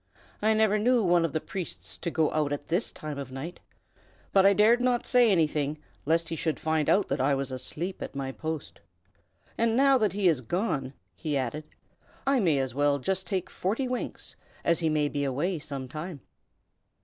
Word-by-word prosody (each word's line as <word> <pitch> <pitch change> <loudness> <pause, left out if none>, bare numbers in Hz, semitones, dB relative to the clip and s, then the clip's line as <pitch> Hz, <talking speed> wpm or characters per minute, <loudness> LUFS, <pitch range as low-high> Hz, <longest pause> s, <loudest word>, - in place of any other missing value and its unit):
"I 220 +1 +3
never 215 -1 +3
knew 240 +1 +3
one 175 -2 +4
of 165 - -2
the 155 - 0
priests 180 +2 -6
to - - -4
go 160 -2 +1
out 150 -2 0
at 145 0 -4
this 175 +7 0
time 150 -2 -6
of 135 -2 -6
night. 140 +7 -6 0.7
But 195 0 +6
I 200 - +6
dared 220 +4 +5
not 245 -1 +1
say 245 -3 +5
anything, 155 -5 +1 0.3
lest 165 +1 +2
he 165 - -2
should 160 0 -1
find 155 -1 0
out 200 0 +3
that - - 0
I 140 +1 +3
was 135 -1 -3
asleep 150 +8 -4
at - - -6
my 135 -1 -3
post. 160 +2 -5 0.8
And 230 0 +2
now 270 -1 +5
that 215 -4 +1
he 200 -2 +2
is 155 -7 +3
gone," 135 - -2 0.2
he 140 - -2
added, 135 +4 -3 0.6
"I 270 -1 +3
may 165 -9 +3
as 130 -2 -1
well 145 +1 +2
just 190 +7 -2
take 190 -3 -1
forty 225 +8 -2
winks, 250 0 -4 0.3
as 170 - +3
he 165 -2 +1
may 150 -1 +2
be 145 0 -2
away 150 +6 -1
some 140 -3 -5
time." 155 +2 -7
160 Hz, 195 wpm, -28 LUFS, 145-200 Hz, 0.8 s, But